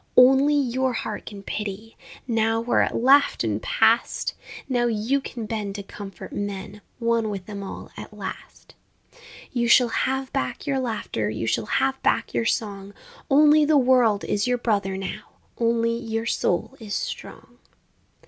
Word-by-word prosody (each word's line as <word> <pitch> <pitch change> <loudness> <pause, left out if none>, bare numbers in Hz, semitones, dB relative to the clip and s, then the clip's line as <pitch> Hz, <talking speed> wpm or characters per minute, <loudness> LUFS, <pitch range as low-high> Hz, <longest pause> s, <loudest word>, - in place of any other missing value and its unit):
Only 270 +3 +6
your 260 -2 +1
heart 215 -2 -5
can 200 -2 -8
pity 210 +2 -5 0.3
Now, 225 -1 +1
where 235 +1 +2
it - - 0
laughed 275 +4 +4
and - - -1
passed, - - +2 0.3
Now 245 -2 +1
you 235 +5 0
can 235 -4 -6
bend 210 -2 -4
to 200 - -5
comfort 195 -2 -9
men, 205 0 -5 0.2
One 230 -2 +1
with 195 -3 -5
them 205 -2 -7
all 195 - -8
at - - -9
last, - - -9 0.8
You 240 -2 0
shall 240 0 +6
have 265 +3 -1
back 275 - -2
your 275 -2 0
laughter, 220 - -2
You 110 +1 -3
shall 110 -1 0
have 270 0 0
back - - +1
your 230 - 0
song, 200 -2 -3 0.3
Only 300 +2 +6
the 295 0 +4
world 245 -6 +4
is 205 +3 0
your 250 0 +2
brother 200 -5 0
now, 195 -1 -5 0.4
Only 230 0 +2
your 225 -1 -3
soul 230 +2 0
is 215 -3 -5
strong! - - -6
230 Hz, 160 wpm, -24 LUFS, 205-260 Hz, 0.8 s, Only